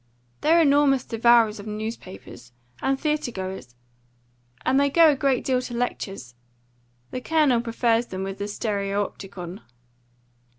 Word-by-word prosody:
"They're 330 +2 +4
enormous 285 -4 +4
devourers 230 -2 +3
of 200 - -9
newspapers, 190 - -8 0.3
and 270 0 0
theatre 305 -3 -1
goers; 190 - -7 0.9
and 265 - +3
they 280 0 +3
go 325 +2 +6
a - - 0
great 270 -3 +1
deal 255 -1 +1
to 245 -1 -6
lectures. 195 - -4 0.8
The 255 - -4
Colonel 295 -6 +2
prefers 235 0 0
them 190 0 -5
with 195 0 -5
the 200 - -3
stereopticon." 200 -3 -4
230 Hz, 130 wpm, -24 LUFS, 195-270 Hz, 0.9 s, go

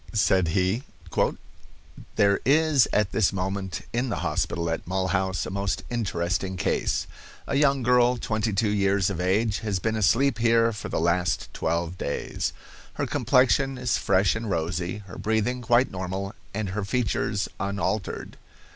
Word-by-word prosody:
Said 95 -3 +3
he: 95 +6 +1 1.3
"There 100 -1 +3
is 150 -2 +4
at 105 -1 +1
this 110 -4 +2
moment 95 -1 -3
in 125 +2 0
the 105 - -2
hospital 85 -1 -1
at 80 - -4
Mulhouse 95 0 0
a - - -5
most 100 0 -2
interesting 95 -4 -1
case. 80 - 0 0.4
A - - -4
young 140 -2 +3
girl 125 0 +4
twenty 110 -1 -1
two 105 +1 +1
years 100 -1 +2
of 90 -2 -3
age 100 +3 +1
has 105 -3 -1
been 110 +4 -1
asleep 115 +4 +2
here 115 0 +3
for 105 - -6
the - - -1
last 90 +2 0
twelve 85 +2 -2
days. 70 - -2 0.4
Her - - -2
complexion 135 +1 +2
is 125 -1 0
fresh 95 0 +3
and 110 0 -4
rosy, 85 +3 -2
her 90 - -10
breathing 110 +3 0
quite 120 +1 +3
normal, 95 +2 -4 0.2
and 105 -1 -3
her 105 +3 -3
features 105 -2 -1
unaltered. 100 0 -3
100 Hz, 150 wpm, -26 LUFS, 95-115 Hz, 1.3 s, is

